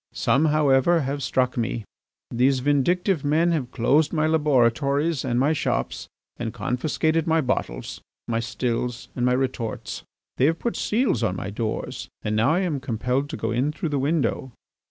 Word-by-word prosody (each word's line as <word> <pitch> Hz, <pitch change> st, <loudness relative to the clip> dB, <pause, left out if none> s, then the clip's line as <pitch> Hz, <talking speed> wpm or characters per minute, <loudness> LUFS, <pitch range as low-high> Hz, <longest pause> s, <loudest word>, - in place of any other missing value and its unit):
Some, 140 Hz, +4 st, +2 dB
however, 150 Hz, +2 st, +3 dB
have 140 Hz, +1 st, -3 dB
struck 125 Hz, -1 st, 0 dB
me. 115 Hz, -1 st, -2 dB, 0.5 s
These 130 Hz, +2 st, +2 dB
vindictive 150 Hz, +5 st, +1 dB
men 160 Hz, +4 st, +2 dB
have 145 Hz, -7 st, -1 dB
closed 140 Hz, +5 st, +2 dB
my 155 Hz, -2 st, +1 dB
laboratories 145 Hz, 0 st, +2 dB
and 120 Hz, -2 st, 0 dB
my 145 Hz, +4 st, +3 dB
shops, 155 Hz, -, -2 dB, 0.3 s
and 115 Hz, -2 st, -3 dB
confiscated 150 Hz, +8 st, 0 dB
my 160 Hz, 0 st, +3 dB
bottles, 125 Hz, -, -3 dB, 0.3 s
my 115 Hz, -1 st, 0 dB
stills, 115 Hz, +1 st, -3 dB
and 125 Hz, -, -2 dB
my 125 Hz, 0 st, +3 dB
retorts. 125 Hz, -3 st, -3 dB, 0.4 s
They 130 Hz, -, +3 dB
have 165 Hz, +3 st, +2 dB
put 235 Hz, -, -2 dB
seals 215 Hz, -, +1 dB
on 105 Hz, -5 st, 0 dB
my 100 Hz, +1 st, -5 dB
doors 110 Hz, +1 st, -4 dB
and 105 Hz, 0 st, -1 dB
now 115 Hz, +7 st, +3 dB
I 180 Hz, -, +1 dB
am 165 Hz, -7 st, -1 dB
compelled 125 Hz, +2 st, -1 dB
to -, -, -5 dB
go 115 Hz, -, -2 dB
in 130 Hz, +6 st, +1 dB
through 165 Hz, +1 st, -4 dB
the 145 Hz, -2 st, 0 dB
window. 140 Hz, -2 st, 0 dB
135 Hz, 170 wpm, -24 LUFS, 120-155 Hz, 0.5 s, however